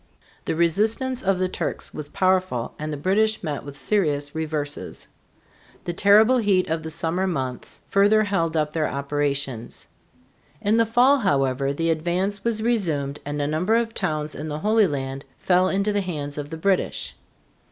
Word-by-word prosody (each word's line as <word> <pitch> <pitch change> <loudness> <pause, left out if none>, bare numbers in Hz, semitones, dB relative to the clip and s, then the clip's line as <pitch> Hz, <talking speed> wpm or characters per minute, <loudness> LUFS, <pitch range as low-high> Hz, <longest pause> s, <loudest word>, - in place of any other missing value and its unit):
The - - -1
resistance 220 +10 +1
of 195 -1 +1
the 185 0 +1
Turks 185 - -4
was 150 -1 -7
powerful 185 -11 0
and 155 0 -4
the 150 - -3
British 215 +8 +1
met 150 -4 -3
with 140 0 -9
serious 145 -4 0
reverses. 155 -2 -4 0.8
The 175 - -3
terrible 215 +7 +5
heat 195 -4 +2
of 160 0 -1
the 160 - -6
summer 170 +4 -1
months 130 -8 -4
further 205 +2 +4
held 165 -6 0
up 150 -1 0
their 155 -2 0
operations. 140 -4 -3 0.7
In 210 +2 +2
the 230 -1 +3
fall, 250 +5 +4
however, 135 - +1
the 165 +3 0
advance 180 +5 -1
was 225 -2 0
resumed 160 -12 0
and 145 +1 -3
a 145 - 0
number 160 +9 +1
of 230 -1 0
towns 155 -4 -2
in 150 - -6
the 150 -1 -3
Holy 215 +4 +3
Land 135 -2 -4
fell 185 0 +2
into 200 +2 0
the 205 - +1
hands 150 -6 -4
of 145 0 -6
the 160 - -6
British. 190 +3 -1
165 Hz, 170 wpm, -23 LUFS, 145-205 Hz, 0.8 s, terrible